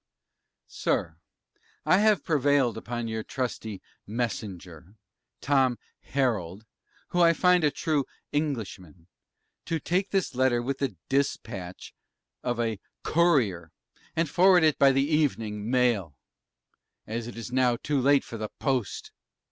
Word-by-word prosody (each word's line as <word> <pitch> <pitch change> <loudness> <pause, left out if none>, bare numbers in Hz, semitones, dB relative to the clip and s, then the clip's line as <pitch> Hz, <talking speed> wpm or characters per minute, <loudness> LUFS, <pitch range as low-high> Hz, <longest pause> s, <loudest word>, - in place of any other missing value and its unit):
SIR, 80 -1 -2 0.7
I 185 - +5
have 210 -6 +3
prevailed 140 -5 +2
upon 120 +2 -4
your 110 0 -3
trusty 110 -4 -4 0.2
'MESSENGER,' 100 -6 -5 0.5
Tom 130 -3 +2 0.2
'HERALD,' 110 -8 -2 0.4
who 175 - +1
I 170 -1 +6
find 180 +1 +3
a 150 - +5
true 145 -1 -1 0.3
'ENGLISHMAN,' 110 - -3 0.6
to 165 - -1
take 185 +6 0
this 195 -7 0
Letter 130 -1 +2
with 135 +3 -3
the 135 -8 -2
'DISPATCH' 100 -9 -2 0.5
of 120 -1 -2
a 115 -3 -1 0.2
'COURIER,' 125 - +2 0.4
and 165 0 +1
forward 180 +2 +5
it 155 -3 +3
by 140 -1 +7
the 135 +1 +2
'EVENING 115 -9 0
MAIL,' 115 - +1 0.9
as 115 +1 -4
it 120 - -9
is 115 +1 -7
now 125 -1 +3
too 140 +3 -1
late 140 +1 +4
for 115 - -8
the 110 -1 -4
'POST. 130 -7 -2
125 Hz, 130 wpm, -27 LUFS, 110-145 Hz, 0.9 s, by